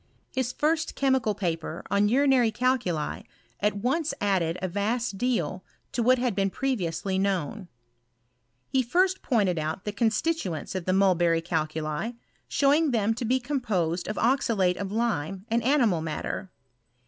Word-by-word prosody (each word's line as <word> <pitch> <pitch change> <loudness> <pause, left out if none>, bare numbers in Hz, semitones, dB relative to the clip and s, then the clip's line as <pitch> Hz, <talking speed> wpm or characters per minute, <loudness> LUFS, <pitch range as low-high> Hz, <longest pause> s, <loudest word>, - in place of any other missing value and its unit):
His 260 -2 -1
first 315 +4 0
chemical 265 -6 +1
paper* 165 -3 -3
on 200 +1 +3
urinary 260 -1 +4
calculi 220 - 0 0.4
at 210 0 +1
once 275 +7 0
added 180 -4 +1
a 185 - -2
vast 205 +2 -1
deal 190 -8 -1 0.3
to 240 - -1
what 255 +2 +4
had 245 -2 0
been 195 0 +1
previously 190 -6 -1
known. 195 0 -1 1.0
He 265 - +2
first 365 +9 +1
pointed 200 - +1
out 155 +4 -3
the 210 - -1
constituents 220 - -1
of 185 -3 -4
the 185 - +1
mulberry 175 -4 +3
calculi, 155 +5 -2 0.4
showinr 290 +2 +3
them 225 -2 +2
to 240 +2 -4
be 255 +3 +2
composed 210 - -1
of 210 - -3
oxalate 230 -8 +2
of 195 0 -4
lime 200 -5 -1
and 235 +1 +2
animid 235 - +3
matter. 160 +4 -4
210 Hz, 145 wpm, -27 LUFS, 180-255 Hz, 1.0 s, urinary